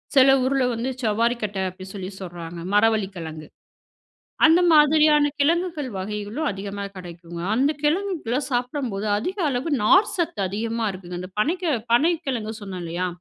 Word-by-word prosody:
சில 270 0 +7
ஊர்ல 270 0 +1
வந்து, 235 +3 -2
சவ்வாரிக்கட்ட 220 -1 0
அப்பிடி 185 +1 -11
சொல்லி 190 -2 -5
சொல்றாங்க 170 -2 -7
மரவள்ளி 215 -1 +3
கிழங்கு. 160 -2 -7 1.0
அந்த 330 +3 +6
மாதிரியான 300 -1 +5
கிழங்குகள் 320 -1 +1
வகைகளும் 210 +9 -3
அதிகமா 200 +1 -6
கிடைக்குங்க. 170 -1 -9
அந்த 275 +4 +3
கிழங்குகள 310 - 0
சாப்பிடும்போது, 245 -4 -2
அதிக 370 - -4
அளவு 260 +5 -2
நார்சத்து 345 - +3
அதிகமா 225 +2 -2
இருக்குங்க. 180 -2 -8
அந்த 185 +1 -8
பனைக்க 340 - 0 0.3
பனைக்கிழங்கு 270 -7 +1
சொன்னேன் 190 -3 -6
இல்லயா! 170 +2 -2
230 Hz, 125 wpm, -23 LUFS, 195-295 Hz, 1.0 s, சில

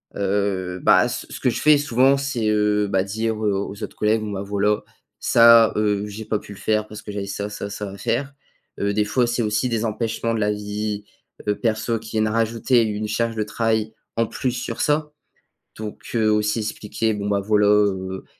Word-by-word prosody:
Heu, 95 -2 -1
bah - - +5
ce - - -4
ce - - -7
que 125 - +2
je - - -2
fais 150 -1 +6
souvent, 135 0 +3
c'est, 135 -5 -2
heu, 105 -1 +2
bah 95 -1 +1
dire 110 +2 -2
aux 100 -1 -2
autres - - -6
collègues, 110 +1 +2
bon 105 -1 -4
bah 100 0 -4
voilà, 105 +1 0 0.4
ça, 115 -1 +6
heu, 105 -1 +1
j'ai 105 +2 -7
pas 105 0 -1
pu 105 - -11
le 100 - -13
faire 110 +1 0
parce 105 - -9
que 105 - -8
j'avais 100 -1 -4
ça, 100 +1 -4
ça, 100 -1 -6
ça 100 0 -5
à 100 - -9
faire. 135 +7 -2 0.5
Heu, 100 0 0
des 105 0 +1
fois, 120 +3 +1
c'est 120 +1 0
aussi 105 +3 0
des 115 -1 -1
empêchements 115 +1 -2
de - - -1
la 105 0 +1
vie, 105 0 -4 0.4
heu, 105 - +2
perso 115 0 0
qui 110 0 -11
viennent 110 0 +1
à 105 - -1
rajouter 115 +2 +2
une 105 -1 -2
charge 115 +2 -1
de 110 - 0
travail 110 0 -1 0.2
en 115 0 +1
plus 130 - -2
sur 125 +1 -4
ça, 150 0 +1 0.7
donc 105 -1 -7
heu, 110 -2 +3
aussi 105 +1 +1
expliquer 110 0 -2
bon 100 0 -3
bah 100 -1 +1
voilà, 105 0 +2
heu, 95 -2 +1
105 Hz, 210 wpm, -22 LUFS, 105-115 Hz, 0.7 s, fais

